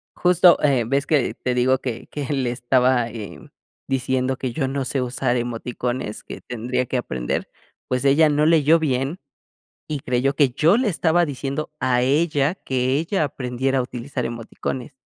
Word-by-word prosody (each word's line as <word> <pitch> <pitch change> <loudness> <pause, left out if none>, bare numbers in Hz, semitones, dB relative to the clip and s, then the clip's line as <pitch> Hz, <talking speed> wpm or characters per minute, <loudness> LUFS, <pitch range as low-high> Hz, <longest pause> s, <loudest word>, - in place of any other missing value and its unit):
justo, 180 0 +5
eh, 135 -5 +3
ves 140 +3 0
que 145 -5 +2
te 125 - -2
digo 130 +1 +3
que 120 -3 -5
que 145 -2 -5
le 130 -3 0
estaba, 125 0 +2
eh, 110 -3 -8 0.5
diciendo 130 0 0
que 130 - -3
yo 135 -2 -1
no 135 0 -2
sé 135 - -1
usar 125 0 -1
emoticones, 120 -1 -4
que - - -9
tendría 125 +1 -2
que 130 - -2
aprender, 65 - -3 0.4
pues 125 +2 -1
ella 150 +3 +5
no 150 +1 +2
leyó 160 0 +5
bien 140 +3 -1 0.7
y 150 -3 -3
creyó 130 +3 0
que 140 -4 +4
yo 160 - +3
le 255 -2 +1
estaba 175 -1 +2
diciendo 140 +1 -4
a 125 -1 +2
ella 145 +4 +2
que 130 -3 -1
ella 165 +1 0
aprendiera 130 0 -1
a - - +3
utilizar 125 +1 -5
emoticones. 120 +3 -5
130 Hz, 165 wpm, -22 LUFS, 125-145 Hz, 0.7 s, justo